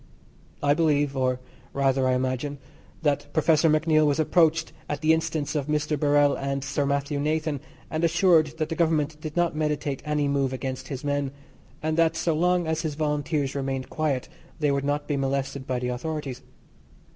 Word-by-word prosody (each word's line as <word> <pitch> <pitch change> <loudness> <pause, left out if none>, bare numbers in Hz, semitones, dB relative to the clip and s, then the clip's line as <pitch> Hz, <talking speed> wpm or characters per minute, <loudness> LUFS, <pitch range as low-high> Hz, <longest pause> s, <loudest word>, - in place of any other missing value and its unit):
I 145 0 +4
believe, 145 -3 +2
or 130 -1 +1 0.3
rather 135 -1 +2
I 130 - +3
imagine, 130 +3 -2 0.5
that 145 -1 0
Professor 160 +1 +4
MacNeill 155 0 +3
was 145 +1 +1
approached 160 +1 +3 0.2
at 145 -1 -3
the 160 0 +5
instance 160 -2 -1
of 145 -3 -1
Mr. 150 0 0
Birrell 145 0 +3
or 140 0 -2
Sir 140 +1 -1
Mathew 140 +1 -1
Nathan 155 0 0 0.3
and 155 +1 -1
assured 165 -2 +3
that 155 -1 -1
the 165 - -2
Government 155 -2 +1
did 155 +1 -6
not 175 -2 +2
meditate 150 -3 -1
any 150 -1 0
move 140 -2 0
against 130 0 -4
his 135 -1 -5
men, 145 -1 0 0.5
and 155 +1 0
that 165 -1 +3
so 165 0 +1
long 175 +2 +2
as 160 0 -1
his 155 -3 -3
Volunteers 150 -2 -1
remained 135 -2 -3
quiet 145 -5 -1 0.3
they 150 -2 +2
would 140 0 0
not 145 +1 -1
be 145 - 0
molested 135 0 -2
by 130 - 0
the 125 0 -2
authorities. 135 0 -4
145 Hz, 180 wpm, -26 LUFS, 140-155 Hz, 0.5 s, the